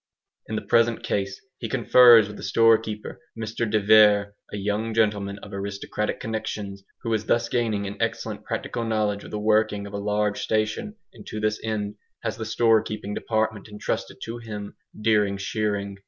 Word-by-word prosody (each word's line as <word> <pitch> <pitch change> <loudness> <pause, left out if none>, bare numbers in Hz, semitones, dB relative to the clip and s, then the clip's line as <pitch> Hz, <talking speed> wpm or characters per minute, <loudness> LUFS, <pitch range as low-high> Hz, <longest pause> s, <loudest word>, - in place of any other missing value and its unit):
In 110 - -3
the - - -2
present 115 -1 +2
case 95 -1 -2 0.2
he 115 - -4
confers 120 -2 +7
with 105 - -9
the - - -10
storekeeper, 115 -2 +2 0.2
Mr 110 0 -2
de 110 0 +2
Vere, 105 -1 +5 0.2
a - - -4
young 105 +3 -2
gentleman 105 -3 +1
of 105 - -10
aristocratic 100 +2 -3
connexions 105 -3 -4 0.2
who 115 -2 -1
is 110 -1 -1
thus 120 0 +2
gaining 110 -4 0
an 100 +1 -6
excellent - - -2
practical 120 - -3
knowledge 105 -2 0
of - - -10
the 105 - -4
working 105 -1 +2
of 100 - -9
a 100 - -3
large 105 0 0
station 110 - -1 0.2
and 110 - -14
to 110 - -5
this 105 0 0
end 105 -2 -3 0.3
has - - -2
the 110 - -4
store 115 0 +4
keeping 105 -1 -5
department 110 -1 -1
entrusted 105 -1 -4
to 115 +1 -5
him 105 -3 -7 0.2
during 105 -2 +2
shearing. 100 0 -2
105 Hz, 175 wpm, -25 LUFS, 105-110 Hz, 0.3 s, confers